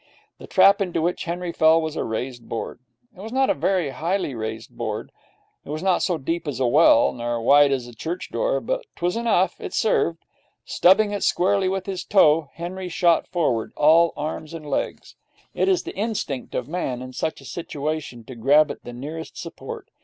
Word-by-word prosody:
The - - -11
trap 200 +1 +5
into 180 -4 -1
which 170 +2 -1
Henry 175 +1 -3
fell 160 0 +4
was 160 -1 -3
a - - -1
raised 120 +2 -5
board. 115 - -5 0.4
It - - -17
was 220 +2 -7
not 265 +1 +2
a - - +3
very 170 -1 0
highly 165 +2 -2
raised 110 -1 -6
board. - - -4 0.5
It - - -14
was 155 +3 -4
not 190 -2 +2
so 180 -3 0
deep 165 +3 -3
as 135 -4 -3
a 130 - +2
well, 135 -1 +5
nor 120 -1 -3
so 115 - -3
wide 145 +4 +5
as 130 -3 -1
a 120 - -11
church 165 +10 -5
door, - - 0
but - - -2
'twas 175 +1 -1
enough 220 -6 +1
it - - -5
served. 170 -6 +1 0.4
Stubbing 205 +3 +4
it 205 - -3
squarely 190 +1 +2
with 190 0 -2
his 190 -2 -4
toe, 155 -6 +4
Henry 180 +2 -5
shot 170 -1 +2
forward, 155 -11 -1
all 165 +3 +5
arms 155 +1 -5
and 155 -2 -8
legs. 140 - -3 0.4
It - - +1
is 370 -2 +2
the - - -7
instinct 200 - -3
of 125 - -2
Man, 135 -7 -3
in 130 0 -9
such 160 +4 -3
a - - -14
situation, 150 -6 -5
to 130 - -10
grab 145 +6 +4
at - - -10
the 120 - -8
nearest 155 +6 -7
support. 435 - -8
165 Hz, 200 wpm, -23 LUFS, 135-185 Hz, 0.5 s, trap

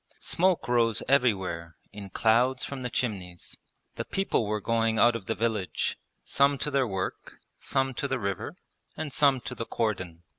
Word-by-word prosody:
Smoke 180 -8 +1
rose 115 -3 +2
everywhere 95 - +1 0.2
in 100 -1 -8
clouds 120 +6 +2
from 140 -2 -6
the 125 - -3
chimneys. 95 -8 -4 0.4
The - - -1
people 195 - 0
were 105 0 0
going 115 0 +1
out 120 +2 +5
of 105 -5 -6
the 110 - 0
village, 110 -5 -1 0.3
some 140 0 +3
to 150 - -3
their 135 -2 +2
work, 95 -3 -4 0.2
some 135 0 0
to 140 - -2
the 135 -1 -1
river, 100 -5 -3 0.4
and 155 -3 -4
some 140 -3 +4
to - - -6
the 115 - -5
cordon. 95 -7 -2
115 Hz, 170 wpm, -28 LUFS, 100-130 Hz, 0.4 s, out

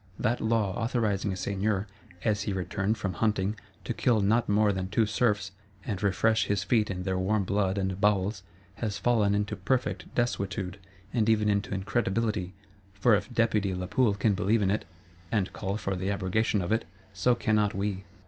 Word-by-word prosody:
That 120 0 0
law 110 -4 +1
authorizing 110 -5 0
a - - -3
Seigneur, 100 +2 -1 0.4
as 105 -2 +1
he 105 0 -2
returned 95 +3 -1
from 100 -2 -2
hunting, 105 +1 0 0.3
to - - -2
kill 120 -4 +2
not 110 +3 +2
more 105 0 +4
than 95 -1 -2
two 110 +3 +2
Serfs, 105 -3 0 0.3
and 100 -4 -3
refresh 110 +2 +2
his 100 -1 0
feet 110 +1 +2
in 90 -2 -3
their 95 -1 -1
warm 100 +2 +1
blood 100 0 0
and 95 0 -2
bowels, 100 -1 +2 0.4
has 105 -3 -2
fallen 110 -4 +2
into 105 +1 -1
perfect 120 +7 -1
desuetude,—and 100 -1 -2
even 105 -1 +3
into 100 0 0
incredibility; 100 -1 -1 0.4
for 110 +4 +4
if 105 +1 +1
Deputy 110 -5 +1
Lapoule 100 +5 +1
can 105 +1 +2
believe 105 +3 +2
in 95 - +2
it, 105 - -1 0.5
and 105 -5 0
call 100 0 -3
for 100 -3 -2
the 95 +2 -2
abrogation 100 +1 0
of 85 - -3
it, 115 +1 +1 0.3
so 110 +6 +2
cannot 105 -3 +1
we. 100 -1 -2
100 Hz, 175 wpm, -28 LUFS, 95-110 Hz, 0.5 s, more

